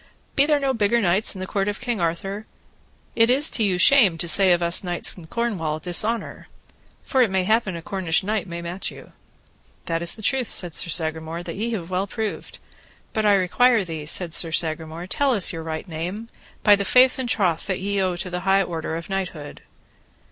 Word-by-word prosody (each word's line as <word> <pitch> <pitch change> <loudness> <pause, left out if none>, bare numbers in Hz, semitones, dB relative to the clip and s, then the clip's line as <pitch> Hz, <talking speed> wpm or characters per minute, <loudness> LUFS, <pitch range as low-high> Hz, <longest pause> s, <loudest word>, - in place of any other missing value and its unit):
Be 280 +1 +3
there 300 -1 +3
no 275 -1 0
bigger 225 0 +2
knights 195 +1 +1
in - - -8
the 185 - -4
court 195 +1 -2
of 205 -1 -3
King 240 -5 -3
Arthur? 195 +5 -3 0.7
it 230 0 +4
is 275 +5 +4
to 230 - 0
you 190 -3 +1
shame 200 -5 +5
to 170 - -1
say 185 +3 +4
of 175 0 +2
us 170 +3 +2
knights 175 -1 -1
of 165 -3 -13
Cornwall 195 -10 -2
dishonour, 210 +8 0 0.6
for 260 - +1
it 235 - +4
may 190 -1 0
happen 215 -2 +1
a 165 - -7
Cornish 185 0 -1
knight 205 -1 -2
may 170 0 -6
match 175 +3 -5
you. - - -13 0.7
That 165 0 -2
is 170 +5 +1
truth, 255 +1 0
said 175 -3 -2
Sir 170 - +3
Sagramore, 160 +1 -1
that - - -7
have - - -8
we 225 - -1
well 185 +2 -3
proved; 220 +1 -5 0.6
but 215 -1 +1
I 205 - +5
require 225 +5 +3
thee, 160 -3 -6
said 170 +1 -2
Sir 165 -1 +2
Sagramore, 160 +1 -2
tell 275 +8 +1
us 195 -4 +2
your 165 - -5
right 160 +2 -5
name, 180 +7 -5 0.3
by 205 - +7
the 200 - -2
faith 255 +6 +4
and 250 -2 -3
troth 180 -7 0
that 190 -2 -2
ye 200 +1 -1
owe 185 -2 0
to 180 +1 -6
the 180 - -2
high 195 +2 +2
order 165 -2 -4
of 170 +1 -6
knighthood. 180 -6 -5
190 Hz, 210 wpm, -23 LUFS, 170-215 Hz, 0.7 s, by